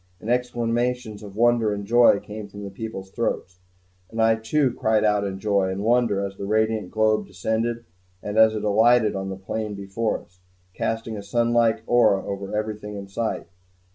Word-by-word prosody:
And 115 - -3
exclamations 120 -2 -1
of 100 -2 -10
wonder 120 -1 +3
and 100 0 -6
joy 120 -1 +5
came 105 0 -8
from 100 +1 -10
the 100 - -6
people's 95 -2 -7
throats; 95 -5 -3 0.5
and 115 - -7
I 115 0 +5
too 125 +5 +1
cried 110 -2 +1
out 105 -1 +2
in 95 -1 -3
joy 100 -2 +1
and 95 +2 -3
wonder 115 -4 +2
as 95 0 -7
the 100 - -5
radiant 110 -2 +1
globe 110 -2 +1
descended, 110 +5 -2 0.4
and 105 - -4
as 110 0 +6
it 105 - -3
alighted 110 +1 +4
on 95 0 -3
the 95 - -5
plain 105 +2 -4
before 100 +3 -2
us, 90 +1 -28 0.3
casting 115 +1 -3
a - - -5
sunlike 115 0 +1
aura 110 -6 +3
over 100 0 -5
everything 105 -1 -4
in 100 -1 -7
sight. 110 +3 -2
110 Hz, 180 wpm, -24 LUFS, 100-115 Hz, 0.5 s, as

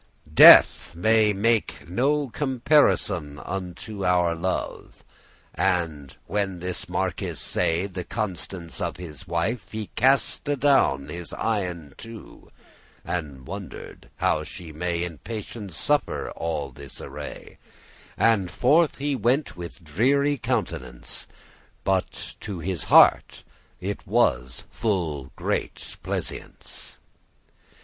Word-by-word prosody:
"Death - - +8
may 110 +5 +4
not 100 - -5
make 115 -2 +1
no 140 - +1
comparisoun 120 - +2
Unto 95 +3 -6
your 90 -2 +3
love." 90 +3 -4 0.5
And 80 -6 -1
when 100 -3 -1
this 90 +1 -4
marquis - - -2
say* 85 +2 0
*saw 100 - -8
The 90 - -4
constance 95 -5 -4
of - - -2
his 85 -1 -10
wife, 90 +7 -2
he 110 -2 -5
cast 135 +4 +2
adown 135 - +3
His 85 -1 -6
eyen 90 -9 -2
two, 115 -1 -11 0.6
and 75 -7 -4
wonder'd 100 +2 -9
how - - +1
she 85 -3 -9
may 85 +2 -2
In 85 -4 -6
patience 105 -4 -7
suffer 145 -3 0
all 75 -4 -3
this 70 +2 -11
array; 70 +1 -9 0.6
And 105 -6 +3
forth 150 - +3
he 140 0 -1
went 130 +5 +1
with 90 +1 -9
dreary 140 - +2
countenance; 115 - -3 0.6
But 95 -1 -2
to 100 - -6
his 85 0 -3
heart - - +5 0.4
it - - -5
was 65 +1 +1
full 85 - -2
great - - -3
pleasance. - - -6
95 Hz, 115 wpm, -25 LUFS, 85-115 Hz, 0.6 s, Death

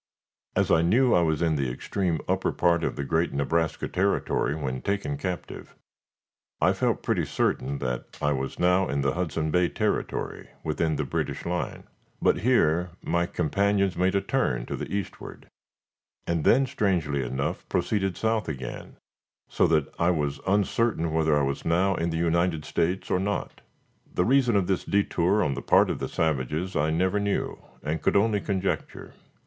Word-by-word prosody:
As - - +2
I 80 - +5
knew 120 +9 +3
I 90 - +5
was 80 -1 +1
in 80 -2 +2
the 70 -2 0
extreme 85 +6 -2
upper - - +1
part 85 -1 +2
of - - -1
the 70 - -3
great 80 +5 0
Nebraska 80 +3 0
Territory 95 -5 0
when 65 -4 -3
taken 100 +9 -1
captive, 90 -9 -6 0.8
I - - +4
felt - - 0
pretty - - +1
certain 70 +2 -1
that 60 -2 -4
I 75 - +1
was 65 -1 -3
now 90 +1 +3
in 70 0 0
the 70 -1 +1
Hudson 80 -3 -2
Bay 90 +1 +3
Territory, - - -2
within 80 0 0
the 75 - -1
British 65 - -3
line. - - -3 0.4
But - - +2
here 90 -8 +2
my 85 0 0
companions 100 +3 +1
made 95 +2 +1
a 100 - +3
turn - - 0
to - - -4
the - - -6
eastward, 100 -2 -5 0.8
and 85 -3 -1
then, 135 - +5
strangely 90 - 0
enough, 65 +2 -3
proceeded 95 -3 0
south 110 -4 0
again, 65 -4 -6 0.5
so - - +2
that 80 -3 +2
I 85 - +3
was 75 -5 0
uncertain 100 -3 +1
whether 80 -2 +3
I 75 - +2
was 70 0 -2
now 90 +4 +2
in 85 -2 -1
the 80 - -2
United 85 -1 +1
States 90 +3 -1
or 90 - +2
not. 100 +2 -3 0.5
The 90 - +1
reason 125 -2 +3
of 100 -2 +3
this 95 -1 0
detour 100 0 +2
on 70 - 0
the - - -5
part - - +4
of - - -4
the - - -3
savages 80 +4 -1
I 75 +1 +2
never 95 +5 +1
knew 100 0 -2 0.2
and 75 +1 -2
could - - +1
only 105 0 +3
conjecture. 95 -2 -3
85 Hz, 175 wpm, -26 LUFS, 75-100 Hz, 0.8 s, I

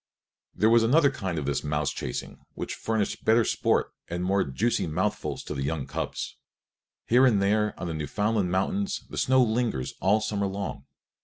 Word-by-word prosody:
There 110 +4 +3
was 115 0 +6
another 140 +5 +4
kind 95 -10 -4
of 75 - -2
this 70 0 -1
mouse 75 -1 0
chasing - - -5 0.2
which - - -4
furnished 110 -2 -2
better 115 0 +4
sport - - +1
and 85 +1 -3
more 95 +1 +2
juicy 95 - 0
mouthfuls 105 - -2
to - - -5
the 70 - -4
young 70 +1 -2
cubs. - - -4 0.7
Here 125 +3 +5
and 110 -5 +3
there 105 +2 +1
on 90 - -4
the 85 - -3
Newfoundland 100 +6 0
mountains 190 - -1
the - - -7
snow 130 0 +4
lingers 115 - -1
all 100 +4 +4
summer 105 -2 -1
long. 100 0 -5
100 Hz, 175 wpm, -27 LUFS, 85-115 Hz, 0.7 s, was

